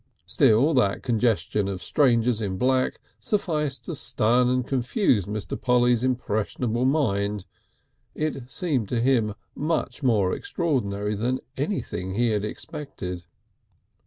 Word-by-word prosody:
Still 125 +9 +4
that 115 -7 +2
congestion 110 -3 +1
of 95 -2 -4
strangers 120 -5 +2
in 95 -3 -2
black 130 +3 +1 0.2
sufficed 150 -9 -1
to 170 - -4
stun 125 -2 +2
and 125 -1 +1
confuse 125 - +1
Mr. 105 0 -4
Polly's 125 -1 +3
impressionable 120 -1 -1
mind. 105 -8 +1 0.7
It 140 -5 -3
seemed 135 - -1
to 120 - 0
him 115 -4 +2 0.2
much 150 -3 -2
more 105 -8 +2
extraordinary 105 - -1
than 120 +5 -1 0.2
anything 95 - -3
he 120 +2 +2
had 105 -2 0
expected. 90 - -6
120 Hz, 120 wpm, -25 LUFS, 105-130 Hz, 0.7 s, Still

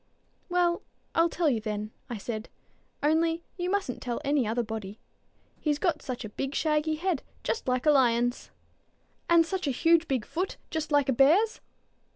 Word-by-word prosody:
"Well, 350 -1 +2 0.3
I'll 330 +1 +4
tell 335 0 0
you, 240 -6 +2
then," 210 0 -4 0.2
I 240 - -3
said; 215 +1 -5 0.5
"only 325 +2 +2
you 355 -1 -2
mustn't 390 -10 -1
tell 240 -2 -3
any 280 -4 +2
other 235 +2 0
body; 215 -2 -6 0.6
he's 295 -2 0
got 320 -1 0
such 250 -2 -5
a - - -6
big 270 +6 -4
shaggy 310 0 +1
head, 335 -2 -1 0.2
just 450 - -2
like 255 +1 0
a 300 - +7
lion's." 245 -3 +2 0.8
"And 335 -1 +6
such 370 -1 -2
a - - +2
huge 330 +5 +3
big 255 -5 -1
foot, 365 +4 -3
just 315 -1 -3
like 290 -2 +3
a 265 - +3
bear's?" 330 - +4
295 Hz, 175 wpm, -28 LUFS, 245-335 Hz, 0.8 s, a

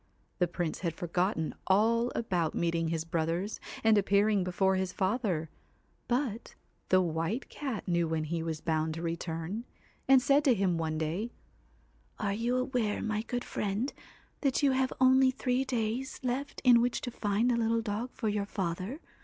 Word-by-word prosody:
The 180 - +3
Prince 170 -1 -3
had 170 -4 -2
forgotten 175 -1 -1
all 230 +5 +3
about 175 -8 0
meeting 165 -1 0
his 160 0 -2
brothers, 170 +4 -1 0.2
and 220 -2 +5
appearing 200 0 +3
before 190 +1 +1
his 190 -1 -1
father, 190 -6 -1 0.6
but 240 -3 -2 0.3
the 185 0 +5
White 165 +9 -2
Cat 265 -9 -4
knew 170 -2 +2
when 160 -1 -1
he 165 +2 -2
was 160 -1 -3
bound 160 -1 0
to 165 - -5
return, 165 +5 -3 0.4
and 265 0 +7
said 280 +2 +3
to 260 -4 +5
him 185 -4 +1
one 160 -1 -1
day 165 +9 -2 0.9
'Are 200 -2 -1
you 235 +4 0
aware, 250 -5 0
my 215 -1 -1
good 245 +2 -3
friend, 210 +6 -2 0.5
that 275 0 +1
you 280 - +5
have 260 0 +1
only 260 0 +6
three 255 0 0
days 245 0 -2
left 260 +3 -2
in 245 -2 +7
which 245 0 0
to 245 - -4
find 215 +2 +1
a - - +2
little 230 0 +1
dog 220 +3 -3
for 225 - -3
your 205 -1 0
father 190 - -3
205 Hz, 170 wpm, -30 LUFS, 170-245 Hz, 0.9 s, and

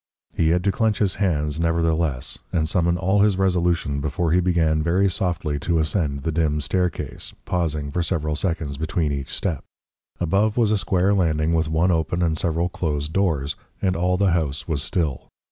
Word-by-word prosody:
He 80 - +2
had 90 +2 +2
to 100 - +2
clench 110 +1 +1
his 100 -3 0
hands, 75 -5 0
nevertheless, 80 -4 0
and 80 -2 +1
summon 85 +1 +1
all 95 +4 +2
his 100 -2 +3
resolution 85 -6 +1
before 75 +3 -1
he 90 - +4
began 85 -3 +2
very 90 +5 +2
softly 85 -5 -1
to 85 +3 0
ascend 75 -3 0
the 80 - -1
dim 75 -2 +1
staircase, 90 +4 -2
pausing 75 -5 -1
for 90 - -1
several 80 -3 -1
seconds 80 -4 -2
between 80 -1 -1
each 70 -1 -4
step. 85 -8 -2 0.6
Above 100 +6 +1
was 115 -3 +3
a 110 - +3
square 95 +1 +2
landing 80 -4 +1
with 80 -1 +1
one 80 +4 +2
open 85 +1 0
and 80 -2 +1
several 85 +2 0
closed 75 -4 -3
doors; 80 -8 0 0.2
and 95 -1 0
all 90 +2 +1
the 100 -1 +3
house 80 -4 -1
was 75 -4 -1
still. 75 -4 -2
85 Hz, 180 wpm, -23 LUFS, 75-90 Hz, 0.6 s, he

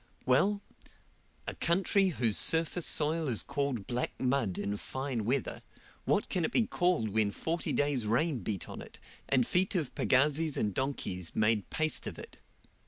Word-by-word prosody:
Well, 195 +11 +2 0.8
a - - -3
country 190 +3 +2
whose 120 - +1
surface 165 +1 +3
soil 155 +1 +3
is 115 -5 +1
called 140 -7 -2
black 125 0 -3
mud 125 -7 0
in 100 - -2
fine 130 -2 -4
weather, 130 +3 -1 0.4
what - - +1
can 180 - -1
it - - -1
be 235 - +2
called 175 - 0
when 105 0 +1
forty 165 - -2
days' 140 -6 0
rain 130 +5 +1
beat 100 -1 -4
on - - -8
it, - - -12 0.3
and 130 -3 +3
feet 185 - +1
of 155 -8 -1
pagazis 150 +4 +2
and 105 -2 -1
donkeys 95 - -3
make 105 -1 +1
paste 155 0 0
of - - -6
it? - - -11
135 Hz, 165 wpm, -31 LUFS, 115-165 Hz, 0.8 s, surface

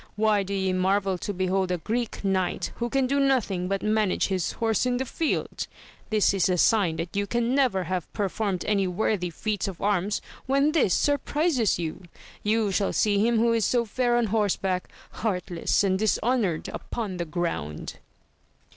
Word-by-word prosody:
why 210 -1 +3
do 195 0 -5
ye 190 -1 0
marvel 190 +1 +1
to 180 - -4
behold 185 0 0
a 180 - +1
Greek 225 +7 -3
knight, 190 -2 0
who 240 0 -2
can 270 +1 +1
do 280 +2 +1
nothing 235 -10 +1
but 195 +1 -2
manage 215 -3 +1
his 185 -3 -1
horse 225 +1 +1
in 245 0 +1
the 265 - -2
field? 320 +5 -2 0.4
this 215 -2 +3
is 195 -1 +2
a 180 - +2
sign 190 -3 +3
that 165 +3 -5
you 200 0 0
can 240 +2 0
never 255 -9 +2
have 180 -1 -3
performed 200 -2 -2
any 200 -3 +1
worthy 180 0 0
feats 205 +4 -2
of 190 -4 -6
arms 205 0 0 0.3
when 275 +3 +3
this 280 - +3
surprizes 290 - +1
you. 165 +1 -4 0.4
You 215 -1 +1
shall 195 +1 0
see 205 -2 +2
him 230 +2 +3
who 230 +1 +3
is 225 -1 +1
so 235 +3 +2
fair 240 +2 +1
on 240 - +2
horseback, 195 -4 0 0.2
heartless 180 -4 -1
and 190 -1 +1
dishonoured 215 -4 +1
upon 210 -6 -5
the 170 - -2
ground 160 - -4
205 Hz, 175 wpm, -26 LUFS, 185-230 Hz, 0.4 s, why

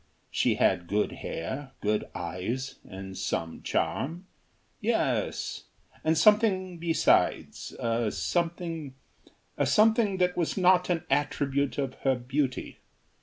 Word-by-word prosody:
She - - +2
had 85 - +2
good 105 +3 +1
hair, 130 - -5
good 105 0 0
eyes, 95 +10 -4
and 95 0 -8
some 80 -3 -3
charm. 170 +7 -1 0.5
Yes. - - -1 0.4
And 160 0 +2
something 190 -2 +3
besides 165 -1 +1
a 115 -1 0
something 165 -4 -2 0.6
a - - +3
something 215 -2 +4
that 180 -1 +2
was 170 +1 -1
not 185 -1 +4
an 175 -1 +1
attribute 140 0 +1
of 135 -2 -1
her 135 -1 +2
beauty. 130 +2 -2
145 Hz, 115 wpm, -28 LUFS, 120-180 Hz, 0.6 s, something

